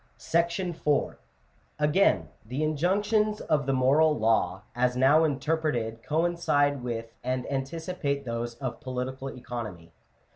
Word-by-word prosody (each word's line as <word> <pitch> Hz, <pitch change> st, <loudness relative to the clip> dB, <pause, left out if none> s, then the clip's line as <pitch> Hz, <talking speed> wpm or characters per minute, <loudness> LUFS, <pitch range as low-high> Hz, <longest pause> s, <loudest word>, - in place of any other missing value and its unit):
M 170 Hz, -3 st, +1 dB, 0.6 s
Again, 150 Hz, +6 st, +3 dB
the 125 Hz, +7 st, -3 dB
injunctions 205 Hz, +7 st, +1 dB
of 145 Hz, -4 st, 0 dB
the 135 Hz, -, +2 dB
moral 145 Hz, +4 st, +4 dB
law, 105 Hz, -4 st, +1 dB
as 125 Hz, 0 st, +1 dB
now 140 Hz, +5 st, +5 dB
interpreted, 145 Hz, -7 st, -1 dB
coincide 150 Hz, -3 st, +1 dB
with 115 Hz, -2 st, -4 dB
and 125 Hz, 0 st, -1 dB
anticipate 140 Hz, 0 st, -2 dB
those 115 Hz, 0 st, -3 dB
of 125 Hz, 0 st, -5 dB
political 130 Hz, +1 st, -4 dB
economy. 110 Hz, -10 st, -7 dB
140 Hz, 110 wpm, -28 LUFS, 125-160 Hz, 0.6 s, now